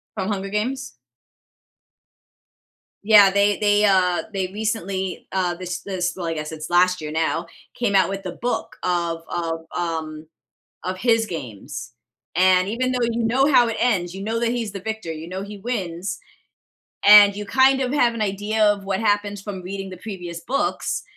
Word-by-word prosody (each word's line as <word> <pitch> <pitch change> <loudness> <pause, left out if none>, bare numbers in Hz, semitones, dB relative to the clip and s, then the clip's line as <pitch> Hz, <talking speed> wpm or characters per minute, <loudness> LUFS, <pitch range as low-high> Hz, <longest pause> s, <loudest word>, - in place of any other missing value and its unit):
From 190 -2 -2
Hunger 195 -2 -2
Games? 255 +7 -3 2.1
Yeah, 205 -2 +7
they 200 +1 +2
they, 205 0 +3
uh 185 -3 +3
they 190 -2 -1
recently, 195 -2 -3
uh 180 -2 0
this 180 0 -5
this 185 -2 -2
well, 180 -2 -4
I 165 - -1
guess 150 0 -5
it's 155 0 -7
last 180 +1 +3
year, 155 -1 -5
now, 165 +1 -1 0.3
came 220 -4 -1
out 190 -1 +4
with 195 0 -5
a 180 - -3
book 245 +7 -3
of 170 -2 -1
of, 165 -1 -3
um 160 -2 -4 0.6
of 185 +1 -3
his 225 +1 +2
games. 135 - -7 0.4
And, 185 +1 +4
even 255 +4 -1
though 250 -1 0
you 230 0 -1
know 265 +6 +3
how 245 -2 +6
it 230 - -3
ends, 185 -8 +1
you 195 - -6
know 220 +3 -2
that 235 0 0
he's 235 -3 -2
the 195 - -6
victor, 220 -3 -5
you 160 +1 -8
know 185 +2 -5
he 205 +1 -8
wins. 195 -4 -4 0.9
And 205 -1 +9
you, 205 0 -5
kind 265 +4 +4
of 255 +1 -1
have 240 -5 +3
an 225 - -4
idea 210 +2 0
of 205 -1 +2
what 195 -1 -1
happens 205 -1 0
from 195 -2 -6
reading 195 +1 -6
the 185 - -9
previous 175 -5 -7
books 255 +11 -1
195 Hz, 180 wpm, -22 LUFS, 175-220 Hz, 2.1 s, And